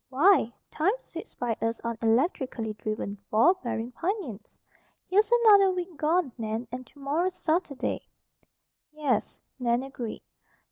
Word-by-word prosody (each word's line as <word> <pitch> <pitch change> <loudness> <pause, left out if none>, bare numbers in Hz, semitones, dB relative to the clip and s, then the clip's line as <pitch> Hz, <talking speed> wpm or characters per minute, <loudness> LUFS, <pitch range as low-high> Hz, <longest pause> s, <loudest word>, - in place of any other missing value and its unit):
Why! 285 - +4 0.2
Time 345 +7 +2
sweeps 335 - -10
by 235 -2 -1
us 230 0 -1
on 230 0 -2
electrically 230 - +1
driven, 210 -1 -4
ball 230 +12 +5
bearing 235 0 -3
pinions. 325 - -4 0.5
Here's 415 +4 +3
another 400 -3 +8
week 360 -2 -3
gone, 310 0 +1
Nan, 220 +2 -3
and 255 +1 -6
tomorrow's 305 +6 -1
Saturday." 315 -4 -1 0.8
"Yes," 295 -7 -1 0.2
Nan 240 0 +1
agreed. 250 -4 -6
270 Hz, 125 wpm, -28 LUFS, 230-350 Hz, 0.8 s, another